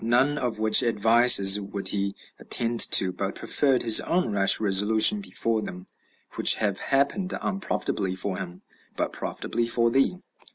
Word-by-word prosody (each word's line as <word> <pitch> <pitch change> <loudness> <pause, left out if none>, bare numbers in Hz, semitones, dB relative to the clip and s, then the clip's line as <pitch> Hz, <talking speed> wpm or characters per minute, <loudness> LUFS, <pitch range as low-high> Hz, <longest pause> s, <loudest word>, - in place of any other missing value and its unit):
None 130 +6 -1
of 120 -4 -4
which 110 0 +4
advises 115 -3 +3
would 100 0 -7
he 100 -1 -4 0.2
attend 115 0 -3
to, 95 -3 +4
but 95 +2 -7
preferred 135 -3 +3
his 115 -2 +4
own 180 -8 -3
rash 100 -1 +3
resolution 110 - +3
before 115 - -4
them, 90 -3 -10 0.5
which - - +4
have 100 -3 -3
happened 140 +8 -3
unprofitably 100 - -5
for 95 0 -5
him, 90 -2 -10 0.3
but - - -5
profitably 115 0 -6
for 115 0 0
thee. 135 +8 -1
110 Hz, 150 wpm, -22 LUFS, 100-125 Hz, 0.5 s, which